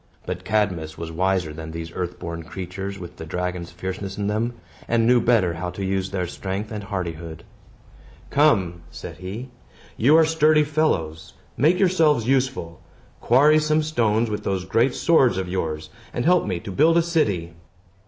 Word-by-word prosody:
But 90 0 -4
Cadmus 90 -8 -1
was 85 -1 -6
wiser 90 -2 0
than 80 +1 -7
these 80 0 -6
earth 90 -1 -4
born 85 0 -6
creatures, 95 +3 -6
with 90 -3 -10
the - - -7
dragon's 90 +1 -3
fierceness 95 +2 -6
in 100 - -2
them, 110 +4 -1 0.3
and 115 -1 +2
knew 120 0 +5
better 110 -7 +3
how 85 +2 -4
to 95 +2 -5
use 95 0 -1
their 90 -2 -2
strength 95 +4 -5
and 105 -2 -5
hardihood. 85 -5 -5 0.9
"Come!" 100 - +3
said - - -9
he. 105 +8 -7 0.5
"You 140 +8 +5
are 165 - +6
sturdy 155 -1 +4
fellows. 80 - -1 0.2
Make 160 +7 +3
yourselves 160 - +3
useful! 130 -11 0 0.4
Quarry 145 +6 +5
some 155 0 +2
stones 115 -7 +1
with 105 - -3
those 95 -2 -2
great 115 +7 +2
swords 135 - +3
of 95 -1 -2
yours, 80 -4 -3 0.2
and 120 - -2
help 180 -5 +4
me 90 -4 -1
to 100 - -7
build 160 - +4
a 170 - +4
city." 100 - 0
100 Hz, 170 wpm, -23 LUFS, 90-130 Hz, 0.9 s, are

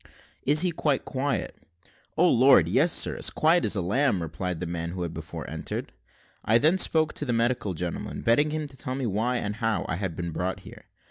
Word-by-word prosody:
"Is 150 +2 +6
he 180 -1 +2
quite 150 -4 -1
quiet?" 140 +1 -2 0.6
"O 180 - +5
Lord! 130 - +5
yes, 140 - +3
sir, - - +2
as - - +1
quiet 165 +3 +2
as - - +2
a 95 - -1
lamb," 115 +3 +2
replied 85 +2 -4
the 90 - -3
man 85 0 -4
who 90 -1 -4
had 85 -1 -5
before - - -7
entered. - - -5 0.5
I 110 - +4
then 160 +9 +3
spoke 160 -3 +2
to - - -3
the 125 -4 -1
medical 115 -5 0
gentleman, 85 +1 -5
begging 130 +7 +3
him 155 0 -3
to 135 -2 -10
tell 130 0 -5 0.2
why, 120 +5 0
and 105 -2 -3
how, 115 -2 -1
I 85 - -2
had 95 -4 -4
been 85 0 -4
brought 90 +3 -3
here. - - -13
115 Hz, 210 wpm, -26 LUFS, 90-145 Hz, 0.6 s, Is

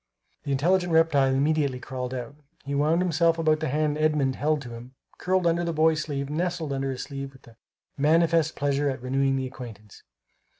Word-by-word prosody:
The 140 - -2
intelligent 175 +6 +2
reptile 160 -5 +4
immediately 140 -1 +1
crawled 125 -1 -5
out. 125 0 -5 0.3
He 140 - -4
wound 155 +5 +2
himself 165 -1 +2
about 155 -1 +2
the 160 - -2
hand 150 +2 0
Edmund 150 -4 +1
held 150 0 0
to 125 - -9
him, 120 +3 -10 0.2
curled 185 0 +1
under 170 +1 +2
the 170 -1 -2
boy's 160 0 +3
sleeve, 140 -2 -3
nestled 160 -1 -2
under 135 0 -2
his 130 -1 -4
sleeve 135 -1 -7
with 130 - -19 0.5
manifest 165 +2 +3
pleasure 145 0 0
at 130 -2 -5
renewing 135 +1 +1
the 130 -1 -2
acquaintance. 115 -5 -10
145 Hz, 180 wpm, -26 LUFS, 135-160 Hz, 0.5 s, reptile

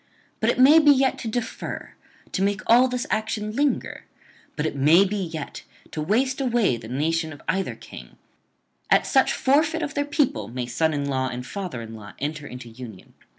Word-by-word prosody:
But - - +2
it - - +1
may 280 +5 +8
be 300 -2 +5
yet 270 -2 +4
to - - -5
defer, 225 +1 -5 0.4
to - - -2
make 200 +1 +1
all 245 +3 +6
this 250 -1 -3
action 215 0 -2
linger; 285 +1 -1 0.5
but 150 - -2
it 155 - -2
may 155 +8 +5
be 200 +2 -2
yet 165 -5 -5 0.3
to 155 - -4
waste 255 - +1
away 240 - +2
the 115 -1 -9
nation 160 +6 -1
of 145 - -10
either 190 +3 -1
king; - - -12 0.7
at - - +4
such - - +3
forfeit 310 +4 +2
of 290 -1 -4
their 285 - 0
people 290 -2 0
may 125 +1 -4
son 155 +6 0
in 145 -1 -2
law 130 -2 -1
and 125 0 -5
father 175 - -5
in 115 0 -9
law 105 -2 -10
enter 145 +1 -4
into 125 -1 -9
union. 115 -4 -11
185 Hz, 195 wpm, -24 LUFS, -, 0.7 s, may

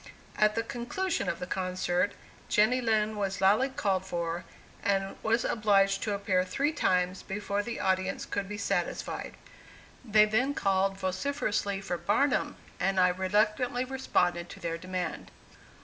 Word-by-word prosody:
At 215 0 +3
the 230 - 0
conclusion 245 +11 -2
of 170 - -2
the - - -5
concert 185 +1 -1 0.4
Jenny 230 +5 +3
Lind 215 -2 +1
was 195 -1 -2
loudly 210 +8 +4
called 195 -7 0
for, 170 -2 -3 0.4
and 195 -1 0
was 230 +2 +1
obliged 195 -3 +3
to 210 -2 -1
appear 190 -2 +1
three 275 +11 0
times 185 - +1
before 200 0 -2
the 230 +3 -5
audience 190 0 0
could 200 -1 -3
be 210 - -4
satisfied. - - -2 0.7
They 215 -3 +5
then 250 +7 +1
called 195 0 +1
vociferously 200 0 -1
for 175 -3 -3
"Barnum," 210 +11 +1 0.2
and 195 0 +1
I 180 0 +6
reluctantly 210 +7 +1
responded 175 -10 0
to - - -10
their 165 -2 -3
demand. 185 -1 -4
200 Hz, 145 wpm, -29 LUFS, 185-220 Hz, 0.7 s, I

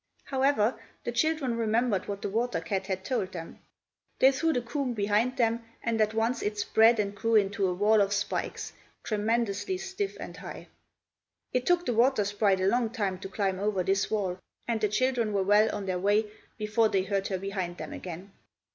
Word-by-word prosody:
However, 265 -4 +1 0.2
the 240 - -2
children 275 -1 +1
remembered 225 -2 +1
what 200 -1 -5
the - - -1
water 230 -1 0
cat 190 +3 -3
had 190 -1 -3
told 245 -8 -1
them. 165 -2 -8 0.6
They 265 - +6
threw 325 +5 +1
the 245 -6 -1
comb 250 0 -2
behind 215 +5 +1
them, 230 -1 +1 0.2
and 230 -1 0
at 215 0 +1
once 225 +3 +1
it 210 0 -2
spread 220 +2 +4
and 200 -1 0
grew 225 +3 0
into 200 -2 +3
a 180 - 0
wall 210 +3 +4
of 200 0 +1
spikes, 200 -1 -2 0.3
tremendously 225 - 0
stiff 385 +1 -4
and - - -8
high. - - -9 0.8
It 250 0 0
took 355 0 +3
the 245 - 0
water 235 -1 +3
sprite 200 -1 +1
a - - +2
long 235 +3 +2
time 200 -6 -2
to 195 - -7
climb 195 -2 -1
over 200 -2 0
this 195 +2 +1
wall, 190 -4 -1 0.3
and 230 -2 -1
the 210 - +2
children 235 0 +1
were 195 -1 +2
well 210 +3 +4
on 205 -1 -4
their 185 -1 -1
way 205 +3 +3 0.3
before 215 +1 +2
they 190 -2 +1
heard 195 0 -1
her 190 - -1
behind 185 -2 -4
them - - -6
again. 180 +2 -8
215 Hz, 195 wpm, -28 LUFS, 195-240 Hz, 0.8 s, They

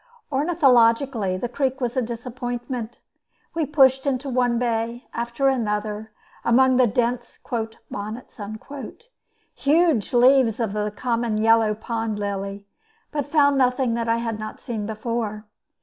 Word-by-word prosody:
Ornithologically, 260 - +3
the 215 - -2
creek 265 +2 -1
was 245 -1 -2
a 260 - +2
disappointment. 240 0 -5 0.6
We 320 -3 -1
pushed 270 -2 +4
into 270 0 -1
one 245 -1 +2
bay 235 0 -1
after 235 +3 -1
another, 215 -4 -1 0.3
among 260 +2 +4
the 255 -1 +5
dense 240 +2 -1 0.5
"bonnets," 215 +3 -7 1.1
huge 305 - +2
leaves 250 -2 +5
of 225 -4 -1
the 210 0 -1
common 235 -2 -1
yellow 220 -1 +4
pond 225 -1 -3
lily, 200 0 -4 0.5
but 290 -2 -2
found 285 -2 +3
nothing 250 -1 +2
that 230 0 -1
I 230 - +3
had 230 -2 -3
not 215 0 -7
seen 215 -4 -4
before. 220 -1 -3
235 Hz, 130 wpm, -23 LUFS, 220-260 Hz, 1.1 s, the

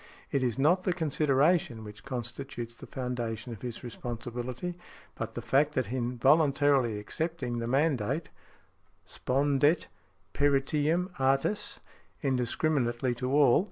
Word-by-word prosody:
It 140 - +1
is 120 -3 0
not 170 +7 +3
the 185 - +1
consideration 150 -5 +2
which 105 -1 -10
constitutes 120 -1 -5
the - - -11
foundation 120 -2 -4
of 110 - -11
his 120 -1 -6
responsibility, 120 +6 -5 0.4
but 115 -1 -5
the 120 - -4
fact 145 +5 +2
that 130 -3 0
in 125 -1 -2
voluntarily 140 -3 +4
accepting 125 +2 -3
the 115 - -2
mandate, 140 +2 +1 0.8
spondet 140 +4 +1 0.4
peritiam 145 +5 +2
artis, 135 +10 +1 0.4
indiscriminately 125 -1 +1
to 125 +1 -3
all. 140 -4 +6
130 Hz, 120 wpm, -29 LUFS, 120-145 Hz, 0.8 s, all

